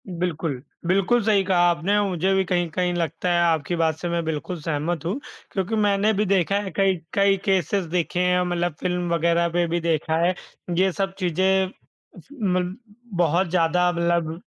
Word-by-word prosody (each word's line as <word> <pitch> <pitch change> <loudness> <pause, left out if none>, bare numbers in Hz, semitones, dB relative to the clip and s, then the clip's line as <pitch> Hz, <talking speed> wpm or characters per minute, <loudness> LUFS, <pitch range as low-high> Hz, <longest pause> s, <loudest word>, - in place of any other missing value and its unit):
बिल्कुल, 165 -6 -3 0.3
बिल्कुल 195 +6 +3
सही 205 -2 +3
कहा 190 -1 +1
आपने, 175 +5 +1
मुझे 185 +1 0
भी 190 - +3
कहीं-कहीं 175 0 0
लगता 170 +1 -2
है, 175 - +3
आपकी 165 0 +1
बात 160 -2 +1
से 175 - -3
मैं 170 0 -1
बिल्कुल 160 +3 -3
सहमत 160 +1 -2
हूँ 195 +11 -2 0.3
क्योंकि 195 +3 -2
मैंने 205 0 +2
भी 210 +1 +1
देखा 195 -1 +2
है 195 -2 -6
कई 195 -1 +3 0.2
कई 200 0 +3
केसेज़ 190 -1 +1
देखे 175 +1 -1
हैं 180 0 +2
मतलब 175 -2 -1
फ़िल्म 180 -1 -1
वगैरह 170 +1 +2
पे 175 0 0
भी 170 +1 -1
देखा 160 -1 0
है, 180 - +2 0.4
ये 190 +1 +3
सब 195 +1 -2
चीज़ें 190 +1 +1 0.8
मल 180 0 -1 0.4
बहुत 175 +2 +2
ज़्यादा 180 +1 +2
मतलब 170 -1 -1
180 Hz, 170 wpm, -23 LUFS, 170-190 Hz, 0.8 s, बिल्कुल